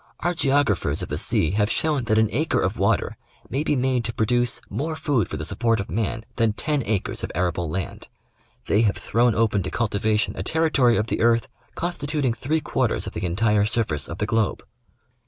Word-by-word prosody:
Our 175 +1 +1
geographers 135 - +1
of - - -6
the - - -1
sea 80 - +2
have 105 +1 +1
shown 150 -4 +1
that 110 -1 +2
an 110 0 +4
acre 155 +7 +1
of - - -1
water - - +1 0.3
may 135 +4 0
be 150 - +1
made 130 -2 +1
to 115 - -2
pro 110 - +1
duce 120 +2 +1
more 160 +3 -3
food 140 - 0
for 80 - -4
the 80 - -4
support 115 +6 +1
of 100 - -5
man 115 +1 -2
than 115 -2 +2
ten 145 +7 -1
acres 105 -3 -1
of - - -3
arable 90 -2 -1
land. 90 +3 -5 0.6
They 105 - +3
have 105 -3 +2
thrown 120 +1 +2
open 110 -3 +2
to 95 - -3
cultivation 110 -1 0
a - - -4
territory 150 -7 +2
of 110 - +1
the - - -2
earth 115 0 +3 0.3
constituting 145 -6 -1
three 150 +7 -1
quarters - - 0
of - - -6
the - - -3
entire 105 +3 +2
surface 105 -10 -1
of 85 - -5
the 105 - -1
globe. 110 -2 0
115 Hz, 205 wpm, -23 LUFS, 105-135 Hz, 0.6 s, an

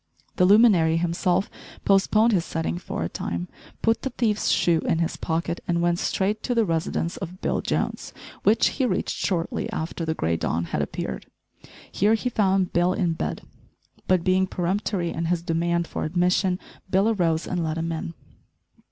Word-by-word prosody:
The 180 - +5
luminary 190 -6 +5
himself 175 +2 +1 0.4
postponed 215 +3 +4
his 180 -4 +2
setting 165 +2 -3
for 130 - -4
a - - -1
time, 85 +1 -4 0.4
put 225 0 +2
the 265 - -2
thief's 225 -4 0
shoe 170 -2 +3
in 165 - 0
his 165 0 -1
pocket 170 +1 -2
and 170 -1 +1
went 175 0 +1
straight 205 +3 0
to 245 - -1
the 230 -1 +3
residence 165 0 -1
of 180 +3 -7
Bill - - -1
Jones, - - -2 0.3
which 215 +2 +4
he 260 -3 0
reached - - -1
shortly 170 -4 -2
after 160 +1 -4
the 160 0 -1
grey 80 - 0
dawn 85 +1 -1
had - - -2
appeared. - - -4 0.6
Here 210 +3 +3
he 250 +3 -2
found 195 -5 +1
Bill 175 +1 +3
in 180 -5 0
bed; - - -4 0.6
but 185 -2 +3
being 185 +1 +2
peremptory 185 0 -1
in 165 - -3
his 170 0 0
demand 170 +1 0
for - - -4
admission, 180 +2 +1 0.3
Bill 190 +3 +3
arose 170 -7 +1
and 175 -2 -2
let 160 0 -2
him 165 +1 -2
in. 165 +1 -5
175 Hz, 175 wpm, -24 LUFS, 165-195 Hz, 0.6 s, The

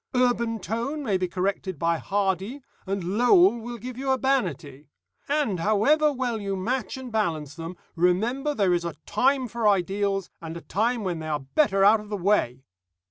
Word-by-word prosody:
Urban 240 -2 +2
tone 235 +9 -3
may 210 -7 0
be 185 -1 0
corrected 190 0 -2
by 165 +1 0
Hardy, 200 +6 -1 0.2
and 195 -1 -2 0.2
Lowell 245 +1 +5
will 240 +1 -6
give 250 +2 -8
you 270 0 -3
urbanity. 180 - -1 0.4
And, 285 - 0
however 275 - +3
well 245 -5 -2
you 195 -1 -2
match 245 +8 -2
and 260 -2 -8
balance 160 -10 -1
them, 165 +1 -7 0.2
remember 230 - +1
there 195 -6 +2
is 175 -1 0
a 170 -2 -4
time 265 0 +2
for 230 -1 -1
ideals, 195 0 +1
and 165 0 -6
a - - -9
time 225 +5 -1
when 175 -4 -2
they 160 - -6
are 150 -2 -1
better 195 - +2
out 215 +2 +6
of 210 0 -11
the 210 - -2
way. 175 - +1
205 Hz, 180 wpm, -25 LUFS, 180-245 Hz, 0.4 s, out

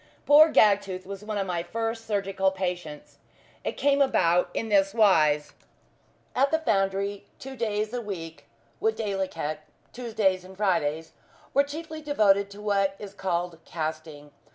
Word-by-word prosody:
Poor 305 +2 +7
Gagtooth 200 -3 +3
was 195 +1 -8
one 210 0 -4
of 195 - -1
my 175 -2 -2
first 225 +5 -4
surgical 195 -2 0
patients. 180 -5 -5 0.4
It - - -2
came 285 0 +2
about 180 -10 +3
in 225 - -3
this 195 0 +3
wise. 155 -9 +3 0.8
At 275 +2 +3
the 320 - +2
foundry, 200 -7 -1
two 270 0 -9
days 215 -3 -1
in - - -18
the 245 0 -3
week, 165 -7 -7 0.3
viz., 210 -4 -1 0.6
Tuesdays 215 -6 0
and 190 0 -13
Fridays, 165 -6 0 0.4
were 280 - +5
chiefly 315 +2 -7
devoted 205 -9 +2
to 205 +1 -11
what 195 -2 +1
is 200 -1 -9
called 175 -3 -2
"casting." 155 -2 -6
195 Hz, 145 wpm, -26 LUFS, 180-225 Hz, 0.8 s, Poor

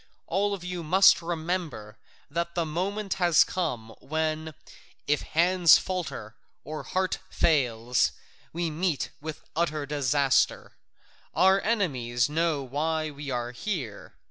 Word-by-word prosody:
All 200 +3 0
of 185 - -11
you 180 -1 -4
must 185 +4 +6
remember 165 - -3 0.3
that 170 +3 -3
the 170 -2 0
moment 190 +5 -2
has 175 -5 +6
come 125 -11 -3
when, 155 0 -2 0.5
if 150 0 +1
hand 175 +1 +1
falters 145 - +3 0.3
or 155 0 -6
heart 185 0 -1
fails, 125 -6 +2 0.4
we 170 -1 -2
meet 160 -1 -1
with 155 0 -7
utter 155 -3 0
disaster: 140 -1 +1 0.6
our 190 +1 +5
enemies 130 - 0
know 155 -2 0
why 155 +4 -2
we 145 0 -7
are 120 -1 -2
here. 125 - -5
160 Hz, 120 wpm, -27 LUFS, 140-180 Hz, 0.6 s, must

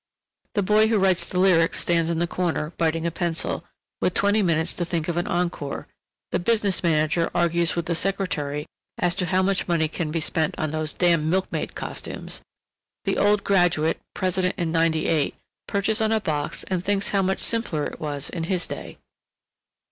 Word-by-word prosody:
The 205 - +2
boy 215 +3 +4
who 220 -1 +2
writes 190 -2 +2
the 180 - -3
lyrics 175 -3 +4
stands 170 -1 +2
in 170 - 0
the 170 - +1
corner, 170 -3 -2
biting 165 0 +1
a 170 - 0
pencil, 170 -1 -1 0.4
with 180 - +1
twenty 205 +2 +3
minutes 165 -3 +1
to 175 - -2
think 170 -2 -2
of 175 - -1
an 175 - -1
encore; 170 -5 -2 0.4
the - - +1
business 205 -1 +1
manager 165 0 +2
argues 170 -1 +2
with 170 -1 -1
the 170 - 0
secretary 160 -6 -1 0.3
as 175 -1 +2
to 180 0 -2
how 185 +1 +2
much 195 0 +1
money 165 -3 +2
can 160 0 -3
be 165 +2 -1
spent 160 0 -1
on 155 -2 -1
"those 155 -1 -2
damn 170 -3 +3
milkmaid 190 +2 -1
costumes"; - - -5 0.6
the - - 0
old 205 0 +3
graduate, 175 -5 +2 0.2
president 185 -1 0
in 170 -2 -1
ninety 165 -1 +2
eight, 155 -3 +1 0.3
perches 210 +2 +1
on 220 0 +2
a 220 - +3
box 150 -7 -2
and 185 -2 -2
thinks 200 0 0
how 200 - +2
much 190 0 +1
simpler 225 -10 0
it - - -6
was 145 -2 -3
in 165 -2 -3
his 180 0 0
day. - - -7
175 Hz, 185 wpm, -24 LUFS, 160-190 Hz, 0.6 s, boy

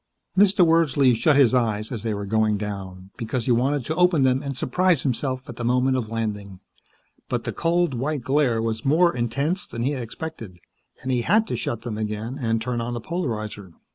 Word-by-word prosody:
Mr. 195 -1 +5
Wordsley 145 -6 +4
shut 140 +6 +3
his 135 -4 +5
eyes 110 -3 0
as 115 -4 -4
they 110 -1 -2
were 100 0 -4
going 110 0 +1
down, 95 -2 -6
because 115 0 -3
he - - +1
wanted 130 +2 +1
to 155 - -1
open 180 -4 +3
them 130 0 +2
and 140 -2 -5
surprise 180 +4 +2
himself, 130 0 -2
at - - -9
the 120 - -4
moment 125 +2 +2
of 120 -4 -2
landing. 105 -4 -4 0.7
But - - -1
the - - -4
cold, 170 -2 +1
white 135 +4 -2
glare 130 -3 +1
was 115 +1 -2
more 165 +5 +3
intense 140 - -1
than 115 - -4
he 135 - +1
had 135 -3 -3
expected, 115 - -7 0.5
and 130 - -2
he 125 -1 +1
had 215 - +3
to 125 - -3
shut 115 -1 -3
them 110 -3 -4
again 110 +5 -4
and 115 -1 +1
turn 120 +1 -2
on 120 +1 -3
the - - -3
polarizer. 110 - -4
125 Hz, 205 wpm, -24 LUFS, 110-145 Hz, 0.7 s, Mr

